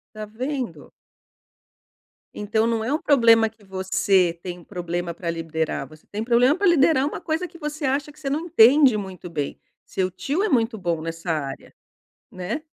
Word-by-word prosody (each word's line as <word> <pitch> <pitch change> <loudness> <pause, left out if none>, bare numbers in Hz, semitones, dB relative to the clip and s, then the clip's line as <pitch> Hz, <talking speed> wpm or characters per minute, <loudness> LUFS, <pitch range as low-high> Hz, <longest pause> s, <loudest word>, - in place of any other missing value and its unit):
Tá 215 0 -5
vendo! 255 +4 -5 1.5
Então, 220 +2 0
não 230 -1 0
é 250 - -1
um 305 - 0
problema 230 -5 +5
que 220 -1 -23
você 190 -2 +1
tem 180 -1 -6
um 175 - -15
problema 175 -1 -4
pra 170 0 -3
liderar, 160 -3 -3
você 155 +2 -17
tem 215 +2 -3
problema 245 +4 +4
pra 400 +2 0
liderar 300 -5 +4
uma 295 - -4
coisa 320 +3 -2
que 340 - -15
você 300 0 -5
acha 280 +2 0
que 295 - -18
você 295 -3 -4
não 285 +3 0
entende 275 -4 +6
muito 190 -3 -7
bem. 145 -4 -3 0.3
Seu 185 -1 -2
tio 275 - -2
é 430 - +1
muito 230 -4 +1
bom 170 -5 -2
nessa 165 +2 -5
área. 140 -4 -4 0.6
Né? 185 - -4
220 Hz, 180 wpm, -23 LUFS, 175-275 Hz, 1.5 s, entende